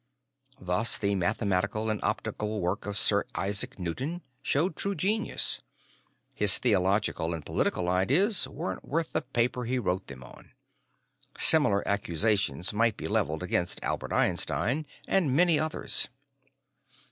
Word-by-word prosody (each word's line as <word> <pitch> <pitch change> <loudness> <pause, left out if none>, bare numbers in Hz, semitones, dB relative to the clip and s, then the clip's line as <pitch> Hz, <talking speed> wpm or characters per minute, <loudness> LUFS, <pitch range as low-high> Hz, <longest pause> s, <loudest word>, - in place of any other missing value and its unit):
Thus, 95 +6 +2
the 100 -1 0
mathematical 100 +2 -1
and 105 - -3
optical 105 0 -3
work 90 +3 -2
of 100 0 -3
Sir 100 0 +2
Isaac 100 +1 0
Newton 130 - -4 0.2
show 145 +6 +1
true 200 +4 -3
genius; 210 +4 -1 0.7
his 105 -2 +6
theological 95 -6 0
and 80 - -9
political 90 - -1
ideas 140 - +3
weren't 95 - -6
worth 165 +2 -3
the - - +1
paper 125 0 -1
he 130 +2 -1
wrote 95 -5 -2
them 65 -2 -10
on. - - -16 0.8
Similar 135 -11 +5
accusations 100 -3 0
might 115 0 +1
be - - -5
leveled - - -1
against - - -1
Albert - - -3
Einstein 145 +6 0 0.2
and 155 -9 +1
many 170 -1 +4
others. 155 0 0
105 Hz, 130 wpm, -28 LUFS, 95-140 Hz, 0.8 s, his